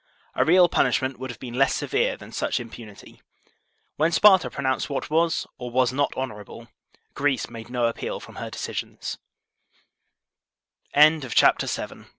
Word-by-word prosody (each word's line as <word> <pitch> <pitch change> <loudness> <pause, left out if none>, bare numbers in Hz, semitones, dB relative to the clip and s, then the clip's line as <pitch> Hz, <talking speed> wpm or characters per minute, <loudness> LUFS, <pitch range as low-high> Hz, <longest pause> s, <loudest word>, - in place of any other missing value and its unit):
A - - +2
real 175 +2 +6
punishment 130 -5 0
would 130 0 -6
have 120 - -8
been 125 -3 -8
less 135 +2 +2
severe - - 0
than - - -13
such - - -1
im 115 -2 -9
punity. 105 -4 -13 0.8
When 160 +3 +2
Sparta 190 -1 +5
pronounced 130 0 -2
what 140 +1 -4
was 165 +1 +1
or 125 -1 -5
was 125 +1 +1
not 145 +2 0
honorable, 115 -2 -7 0.4
Greece 140 -2 -1
made 115 0 -9
no 125 -1 0
appeal 115 - -3
from - - -13
her - - -5
decisi - - -5
130 Hz, 140 wpm, -24 LUFS, 120-145 Hz, 0.8 s, real